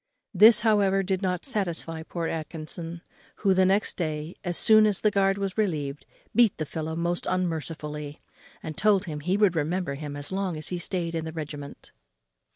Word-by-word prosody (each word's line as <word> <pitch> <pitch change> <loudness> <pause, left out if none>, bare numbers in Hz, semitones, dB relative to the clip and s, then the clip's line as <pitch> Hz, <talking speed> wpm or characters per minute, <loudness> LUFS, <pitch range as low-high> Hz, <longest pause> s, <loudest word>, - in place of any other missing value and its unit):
This, 215 +4 +8
however, 200 -3 +3
did 190 0 -1
not 180 -2 -1
satisfy 170 -8 -2
poor 165 +1 -4
Atkinson, 165 +1 -6 0.3
who, 195 -2 +2
the 185 0 +4
next 195 +2 +1
day, 155 -1 -3
as 175 -2 -1
soon 215 -1 +6
as 205 -3 +1
the 215 - +3
guard 195 -1 +2
was 195 +1 -3
relieved, 150 -8 -2 0.3
beat 235 -4 +4
the 155 - -2
fellow 160 +1 -4
most 170 +1 -2
unmercifully, 155 -4 -3 0.4
and 155 - -5
told 205 0 +3
him 155 -4 -5
he 180 +6 0
would 205 -4 +3
remember 165 0 -1
him 145 0 -6
as 145 +2 -5
long 190 -3 -2
as 155 - -5
he 180 - -3
stayed 175 -2 -2
in 165 -1 -2
the 160 - -5
regiment. 145 -3 -7
175 Hz, 180 wpm, -26 LUFS, 155-195 Hz, 0.4 s, This